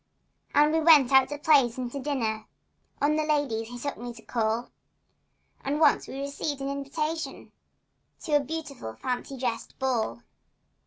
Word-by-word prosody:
And 295 +2 +5
we 320 - +3
went 305 -5 +6
out 265 -1 +6
to 290 - -4
plays 280 -5 +4
and 250 -2 -4
to 280 - -4
dinners— 240 -6 -2 0.6
On 300 +1 +3
the 310 - +1
ladies 285 -8 0
he 245 +1 -8
took 285 +3 -4
me 240 0 -5
to 225 - -13
call— 225 0 -1 0.9
And 285 +2 -1
once 300 -3 +4
we 270 - -6
received 280 0 -3
invitations 280 +4 -3 0.7
To - - -5
a - - +2
beautiful 280 - -6
fancy 255 +1 -4
dress 240 -3 -3
ball. 225 - -1
275 Hz, 155 wpm, -27 LUFS, 240-295 Hz, 0.9 s, went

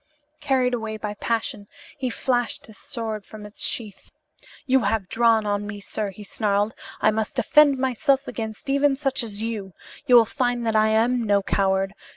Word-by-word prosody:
Carried 265 -4 +1
away 220 -2 -3
by 210 -1 -4
passion, 210 -1 -2 0.3
he 260 -2 -2
flashed 245 0 -1
his 220 - -15
sword 220 -5 -5
from 215 +1 -11
its 210 - -7
sheath. 215 -4 -4 0.6
"You 265 0 +4
have 205 -3 0
drawn 225 -2 +3
on 205 0 -1
me, 205 0 -6
sir," 205 +1 -4
he 195 +2 -10
snarled. 205 +1 0 0.3
"I 215 - +4
must 220 0 -2
defend 295 -2 +5
myself 265 +2 +1
against 220 +2 -6
even 280 0 +3
such 270 -1 -1
as 215 -2 -4
you. 210 -5 -4 0.3
You 250 - +6
will 235 -1 +8
find 245 -1 -1
that 225 -1 0
I 215 0 +4
am 230 +3 +2
no 205 -3 +2
coward. 195 0 +1
225 Hz, 180 wpm, -24 LUFS, 210-250 Hz, 0.6 s, will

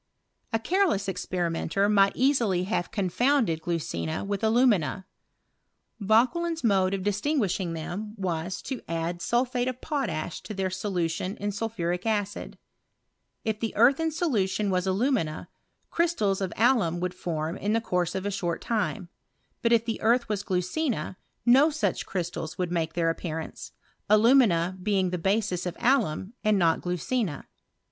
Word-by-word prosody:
A 225 - +2
careless 315 - +1
experimenter 180 +1 -1
might 200 -1 +4
easily 235 -9 +2
have 185 -2 -1
confounded 205 - +1
glucina 145 - -2
with 200 +2 -3
alumina. 215 - +2 0.9
Vauquelin's 260 - +2
mode 195 -3 +3
of 190 - -4
distinguishing 205 - 0
them 195 +7 -5
was, 180 -1 -3
to 265 -3 -5
add 165 +1 -3
sulphate 245 +1 0
of 255 -1 -3
potash 180 - -3
to 215 - -7
their 190 -1 -1
solution 185 -1 -2
in 205 0 -2
sulphuric 195 -3 -2
acid 205 -2 -2 0.9
If 220 -1 -1
the 225 -1 -3
earth 245 +6 +5
in 325 0 +1
solution 215 - 0
was 180 0 0
alumina, 190 - 0 0.4
crystals 220 - +1
of 190 -2 -1
alum 220 -8 +3
would 180 0 -2
form 165 -2 -3
in 205 +1 -1
the 225 - +3
course 180 -6 -1
of 190 0 -3
a 205 - -1
short 175 -4 -2
time; 215 -5 -2 0.5
but 230 - +2
if 230 -1 +4
the 225 -1 -3
earth 235 +2 +3
was 210 -2 -1
glucina, 185 - -1 0.3
no 265 +6 +6
such 310 0 -1
crystals 175 -2 -4
would 180 -2 -2
make 165 -2 -1
their 165 -1 +1
appearance, 160 -1 -6 0.4
alumina 210 -6 +4
being 190 -2 +1
the 180 - -2
basis 190 -1 0
of 175 - -5
alum, 220 - +1
and 215 -2 +3
not 165 -3 +2
glucina. 180 - -2
195 Hz, 145 wpm, -27 LUFS, 175-230 Hz, 0.9 s, no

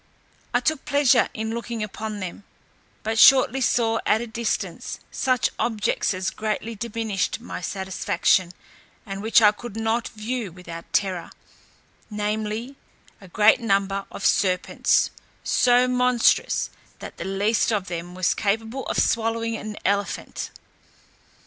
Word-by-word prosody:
I - - +3
took 315 -3 0
pleasure 285 -2 +3
in 220 0 -4
looking 235 -1 -4
upon 215 0 -5
them; 185 +2 -6 0.6
but 220 +1 -1
shortly 270 +1 +7
saw 225 -2 +2
at 215 - +4
a 235 - -4
distance 230 0 -3
such 255 -3 +1
objects 220 -3 0
as 185 0 -2
greatly 220 +1 -3
diminished 220 -3 -2
my 240 - -7
satisfaction, 190 -1 0 0.5
and 195 -2 -6
which 225 +1 +4
I 210 - +8
could 225 0 -9
not 225 +1 0
view 220 -1 -4
without 170 -1 -10
terror, 185 -4 0 0.8
namely, 215 +4 -3 0.4
a 190 - -12
great 210 +6 +4
number 195 -3 0
of - - -6
serpents, 185 -2 +2 0.3
so 245 0 +4
monstrous, 250 -1 +2 0.3
that - - -10
the - - -5
least 200 +4 +1
of 205 -4 0
them 175 +1 -6
was 185 -1 +2
capable 225 +5 -2
of - - -2
swallowing 230 0 +1
an 215 -1 -6
elephant. 200 +1 -1
220 Hz, 130 wpm, -24 LUFS, 195-230 Hz, 0.8 s, I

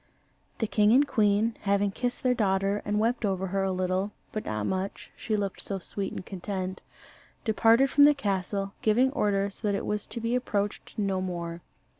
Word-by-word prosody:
The 225 - 0
king 210 0 +3
and 280 +3 +5
queen 215 -2 +2
having 200 0 +1
kissed 245 +4 -3
their 255 -1 +4
daughter 200 -2 +1
and 210 0 0
wept 235 +2 +1
over 190 -2 0
her 195 +1 -1
a 195 0 0
little, 185 +2 -1 0.2
but 215 - -4
not 110 -1 -2
much, 190 - -3
she 215 -2 -2
looked 200 -2 -3
so 195 - -3
sweet 195 +1 -4
and - - -6
content 190 -1 -4 0.6
departed 230 +4 +4
from 285 - +7
the 295 0 +6
castle, 195 -4 -2
giving 245 +5 +3
orders 200 -5 0
that 205 -2 0
it - - -3
was 210 -1 -2
to 235 - -5
be 230 +1 -1
approached 210 -5 -2
no 195 -3 0
more. 170 -2 -4
205 Hz, 185 wpm, -28 LUFS, 190-225 Hz, 0.6 s, from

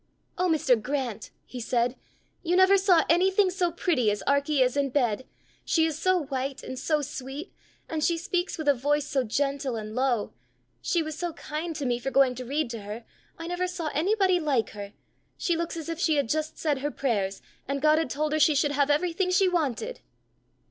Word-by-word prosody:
"Oh, 365 0 +1
Mr. 265 -7 +3
Grant!" 250 -3 -3 0.2
he 250 - -8
said, 240 +1 0 0.5
"you 350 +1 0
never 375 +1 +6
saw 375 -4 +4
anything 375 +3 +3
so 355 -1 0
pretty 310 -9 +1
as 205 0 -2
Arkie 280 0 +3
is 250 0 0
in 280 -1 +1
bed! 255 -3 0 0.4
She 320 -1 +2
is 310 -2 -2
so 370 -3 +2
white, 270 -1 -4
and 260 - -6
so 305 -2 0
sweet! 275 +4 -7 0.3
and 315 -1 -2
she 340 +1 +2
speaks 355 +2 -2
with 315 -2 -5
a 285 - +6
voice 290 +3 0
so 285 -3 0
gentle 275 +2 -1
and 215 -1 -6
low! 250 -3 0 0.5
She 340 -2 +1
was 310 -1 -5
so 345 -2 -2
kind 315 +3 -5
to 290 - -3
me 240 -1 0
for 255 - -3
going 270 -1 +4
to 250 0 -7
read 280 0 -1
to 230 -2 -6
her! 210 +3 -7 0.3
I 330 - -7
never 355 +1 -1
saw 345 -4 -4
anybody 375 +3 +2
like 280 -8 0
her! 205 -1 -8 0.4
She 345 - 0
looks 335 0 -3
as 325 - -6
if 330 -1 -4
she 320 -3 +2
had 280 -5 0
just 310 +2 -1
said 295 -4 0
her 290 +2 -1
prayers, 205 -9 -2 0.2
and 275 +1 -1
God 305 +2 +4
had 320 - -1
told 300 +3 -1
her 310 - +1
she 305 0 +5
should 290 +1 +2
have 285 0 +1
everything 350 +5 +1
she 380 +1 +4
wanted." 345 - -1
295 Hz, 210 wpm, -27 LUFS, 260-335 Hz, 0.5 s, never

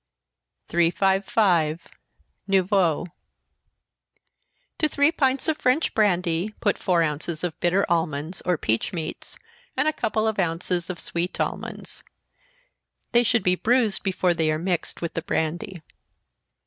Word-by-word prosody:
355. 175 -1 +2 0.6
Noyeau. 190 -4 +2 1.7
To 310 - +2
three 285 +2 +3
pints 270 -2 +1
of 315 -1 0
French 255 +6 +2
brandy, 180 -1 +1
put 205 - 0
four 175 -3 +2
ounces 155 +1 -3
of 175 -3 -3
bitter 180 +3 +2
almonds, 165 0 -1
or 180 -2 +1
peach 115 +2 -1
meats, 160 -2 -6 0.4
and 265 +3 +2
a 310 - +2
couple 220 -6 0
of 220 -2 -1
ounces 175 0 -1
of 180 - -4
sweet 170 +2 -3
almonds - - -4 1.1
they 240 - +5
should 230 -2 +2
be 180 - +4
bruised 225 +1 +2
before 185 -2 +1
they 160 -2 +1
are 155 - 0
mixed 175 0 -2
with 165 - -3
the 165 - -2
brandy. 165 +2 -3
180 Hz, 130 wpm, -24 LUFS, 165-215 Hz, 1.7 s, they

